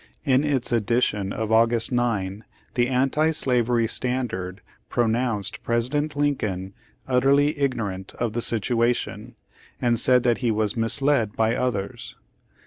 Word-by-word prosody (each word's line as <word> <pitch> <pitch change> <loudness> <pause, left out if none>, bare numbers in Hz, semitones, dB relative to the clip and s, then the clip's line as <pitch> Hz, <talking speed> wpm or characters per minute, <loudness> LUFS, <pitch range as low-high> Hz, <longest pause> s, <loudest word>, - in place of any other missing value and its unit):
In 135 -1 +3
its 140 -5 0
edition 115 -3 0
of 110 +1 -3
August 115 +1 +3
9, 105 -5 -1 0.3
the 120 -1 +1
Anti 135 +5 +2
Slavery 125 -6 +1
Standard 110 -7 -3 0.3
pronounced 115 -3 0
President 140 +6 -1
Lincoln 105 -10 -1 0.3
"utterly 140 +4 +3
ignorant" 105 -9 -3
of 120 -3 -2
the 120 - -2
situation, 115 +2 -1 0.4
and 120 -2 +1
said 125 -1 +5
that 120 -2 +1
he 120 - 0
was 110 -1 +1
"misled 115 -1 +1
by 115 +1 +1
others." 110 -6 -3
120 Hz, 125 wpm, -24 LUFS, 110-130 Hz, 0.4 s, said